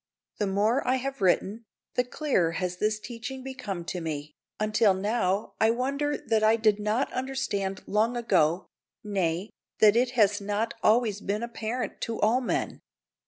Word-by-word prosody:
The 205 - +1
more 210 +7 +2
I 255 - +3
have 270 0 -4
written, 195 +4 +1 0.3
the 250 - +2
clearer 250 - 0
has 180 +1 -2
this 215 +2 0
teaching 245 +4 -7
become 235 -10 -5
to 180 0 -4
me, 150 -2 -5 0.3
until 215 -1 +3
now 200 0 0
I 220 - +5
wonder 280 +5 0
that 220 -1 0
I 215 +1 +5
did 215 -2 +2
not 215 +5 0
understand 205 -8 -2
long 225 +4 +1
ago 180 -7 +2 0.4
nay, 190 -2 -1 0.3
that 215 -1 +6
it 245 +1 +3
has 205 -2 +4
not 205 +3 -1
always 215 -2 +3
been 210 +3 -2
apparent 235 +1 -4
to 230 -2 -3
all 230 +5 +3
men. 245 - -2
215 Hz, 160 wpm, -27 LUFS, 195-240 Hz, 0.4 s, that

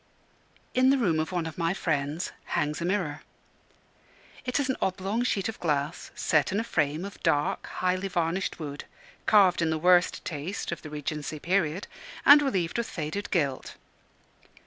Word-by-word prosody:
In 255 +1 +4
the 275 - +5
room 180 -11 +2
of 155 +2 -2
one 175 -2 -1
of 160 +2 -7
my 165 +2 +1
friends 150 0 -1
hangs 150 +2 -1
a - - -1
mirror. 175 -6 -1 1.2
It 250 +2 0
is 280 - 0
an 260 - 0
oblong 190 +4 -1
sheet 210 -6 0
of 225 - -6
glass, 150 -1 -1
set 150 +1 +2
in 200 - +1
a - - 0
frame 155 -4 0
of 200 - -9
dark, 145 0 +1
highly 185 +1 -1
varnished 175 +1 -1
wood, 145 -2 -6 0.4
carved 195 -5 +5
in 165 - +2
the 160 - 0
worst 180 +2 +3
taste 160 +5 -4
of 170 - -4
the 155 - -8
Regency 150 +1 -4
period, 175 +2 0 0.4
and 290 +1 +9
relieved 195 -8 0
with 235 - -2
faded 165 +6 -4
gilt. 145 -8 -1
175 Hz, 170 wpm, -28 LUFS, 155-195 Hz, 1.2 s, and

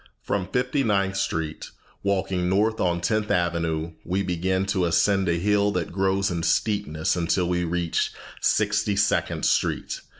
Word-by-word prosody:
From 95 -3 -1
Fifty 125 +6 0
ninth 100 -4 +1
Street, 80 -5 -3 0.3
walking 95 -2 0
north 105 +4 +1
on 85 -1 +1
Tenth 110 +2 0
Avenue, 85 -2 0
we 95 +3 -1
begin 95 +1 0
to 95 -2 0
ascend 95 +3 +2
a 85 - +2
hill 105 +3 +2
that 90 -3 -2
grows 95 +1 +1
in 85 -1 -2
steepness 80 -3 0
until 90 +1 +1
we 90 0 0
reach 85 0 -1 0.3
Sixty 105 -1 +1
second 100 0 +1
Street. - - 0
95 Hz, 145 wpm, -25 LUFS, 85-100 Hz, 0.3 s, ascend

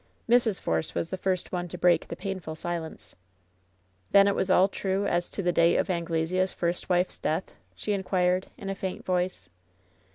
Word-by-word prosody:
Mrs. 235 -4 +3
Force 80 -1 -1
was 165 - -1
the - - -1
first 185 -1 -1
one 175 -1 -2
to - - -7
break 175 -2 +3
the - - -5
painful 185 -5 -5
silence. 165 -1 -5 0.9
"Then 200 0 +6
it 200 - +3
was 190 - -1
all 185 +1 +6
true 195 0 -1
as 175 -3 0
to 200 - -4
the 175 - +2
date 170 0 +4
of - - +1
Anglesea's 170 +2 0
first 175 +1 -2
wife's 180 0 +1
death 160 +4 -2
?" - - -38
she 210 - -2
inquired, 185 -1 +1
in 195 - -8
a - - -1
faint 190 -1 -5
voice. 180 - -1
180 Hz, 190 wpm, -27 LUFS, 170-190 Hz, 0.9 s, Then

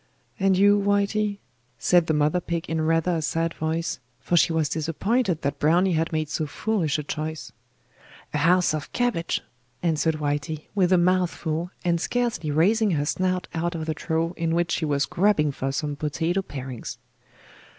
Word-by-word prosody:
'And 190 -1 +3
you, 205 +1 +5
Whitey?' 205 +1 +1 0.4
said 175 +6 +3
the 155 - +2
mother 150 +4 +2
pig 170 -1 -3
in 160 0 -1
rather 165 +2 +2
a - - -2
sad 165 +2 -1
voice, 160 -2 -2 0.2
for 175 - -1
she 170 0 +4
was 160 -2 +1
disappointed 165 - 0
that 140 0 -2
Browny 175 +6 +3
had 165 0 0
made 155 -1 -1
so 155 +1 -2
foolish 170 -1 -1
a 150 - -3
choice. 155 +1 -5 0.8
'A 150 - 0
house 175 +2 +3
of 155 -2 -4
cabbage,' 220 -9 0 0.4
answered 160 -1 +1
Whitey, 145 +1 -2
with 190 -3 +2
a 185 - +6
mouth 180 0 +3
full, 165 +1 -3 0.2
and 170 -1 +1
scarcely 240 -10 -1
raising 205 +9 +3
her 145 - 0
snout 185 +3 -1
out 170 +1 -1
of 160 -1 -3
the 160 - -1
trough 165 +2 -1
in 165 -1 0
which 170 0 +1
she 160 - 0
was 140 -2 +1
grubbing 180 -5 +2
for 135 0 -3
some 145 +1 -2
potato 160 +5 -1
parings. 130 - -7
165 Hz, 175 wpm, -25 LUFS, 155-180 Hz, 0.8 s, a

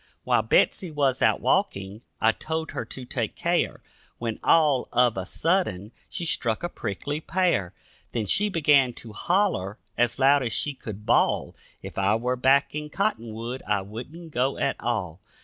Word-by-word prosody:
While - - +3
Betsy 185 - +2
was 140 -4 0
out - - +3
walking 100 +2 0 0.2
I 110 - +4
told 160 +6 -4
her - - -4
to 130 - -8
take - - -3
care, - - 0 0.3
When 115 -2 -4
all 150 -6 +3
of 125 -1 +3
a 95 -1 -4
sudden 160 - 0 0.2
she 170 - -3
struck 120 -4 0
a 175 - -1
prickly 145 - -4
pear, 170 - 0 0.4
Then 115 -3 -2
she 205 - +3
began 145 -8 +4
to 115 -2 -9
hollow 175 - 0 0.2
as 120 -1 +2
loud 140 +1 +5
as 115 - -2
she 145 - -1
could 105 -5 -9
bawl, - - +2 0.3
If - - -6
I 100 +2 +3
were 125 +3 0
back 135 +3 +3
in 150 0 -4
Cottonwood, 120 - -2
I 105 -2 +1
wouldn't 140 - -9
go 130 +1 0
at - - 0
all. 95 -8 -3
125 Hz, 165 wpm, -25 LUFS, 110-155 Hz, 0.4 s, loud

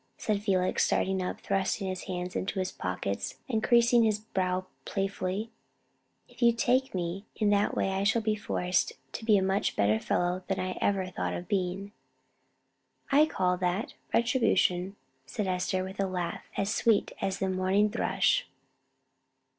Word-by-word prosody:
said 210 -2 -1
Felix, 185 -3 +1
starting 190 0 +1
up, 180 - -4
thrusting 195 0 -1
his 185 -1 -4
hands 180 -1 -4
into 195 +1 -2
his 185 -1 -1
pockets, 90 +2 -3
and 220 -4 -1
creasing 235 -1 +5
his 215 -2 +3
brow 185 -3 -2 0.2
playfully, 195 +2 -2 0.8
"if - - -18
you 235 0 +6
take 250 +1 +1
me 180 +3 -3
in 210 -1 +2
that 205 0 +2
way 195 - +1
I 190 +1 -1
shall 220 +2 +2
be 215 -1 +1
forced 180 -4 0 0.2
to - - -6
be 215 -2 +5
a 190 - +2
much 195 +1 0
better 105 +2 +3
fellow 180 +7 0
than 195 - -1
I 185 0 -2
ever 195 -2 +1
thought 185 - -3
of 175 - -6
being." 195 0 -2 1.2
"I 295 +3 +6
call 180 -10 +1
that 180 +4 -1 0.2
retribution," 205 -6 +2 0.3
said 210 -4 -3
Esther, 185 0 0
with 190 +1 -8
a 195 - +1
laugh 180 -2 -3
as 200 +2 0
sweet 225 -3 +2
as 195 0 -1
the 195 - -1
morning 190 +3 +2
thrush. - - +1
195 Hz, 160 wpm, -29 LUFS, 185-215 Hz, 1.2 s, you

